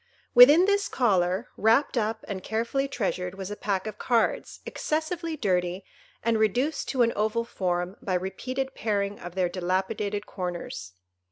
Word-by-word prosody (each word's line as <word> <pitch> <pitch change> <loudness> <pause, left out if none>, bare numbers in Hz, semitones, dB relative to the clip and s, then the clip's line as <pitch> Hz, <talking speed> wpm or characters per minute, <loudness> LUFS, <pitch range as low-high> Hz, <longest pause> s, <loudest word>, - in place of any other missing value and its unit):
Within 290 +9 +9
this 405 0 +2
collar, 190 -3 +1
wrapped 230 +8 +3
up 220 -1 -1
and 195 -3 -4
carefully 235 +5 -1
treasured, 185 -7 -2
was 190 0 -6
a - - -3
pack 200 -2 -2
of 215 -1 -6
cards, 235 -2 0
excessively 320 +1 -2
dirty, 180 -5 0 0.4
and 230 -1 +2
reduced 250 +8 +1
to 255 -3 +3
an 230 - +2
oval 220 +2 0
form 180 -3 -2
by 185 - -1
repeated 255 +9 -3
paring 205 -3 -1
of 175 +1 -9
their 185 -1 +2
dilapidated 190 +3 -2
corners. 175 - -5
210 Hz, 150 wpm, -27 LUFS, 185-245 Hz, 0.4 s, Within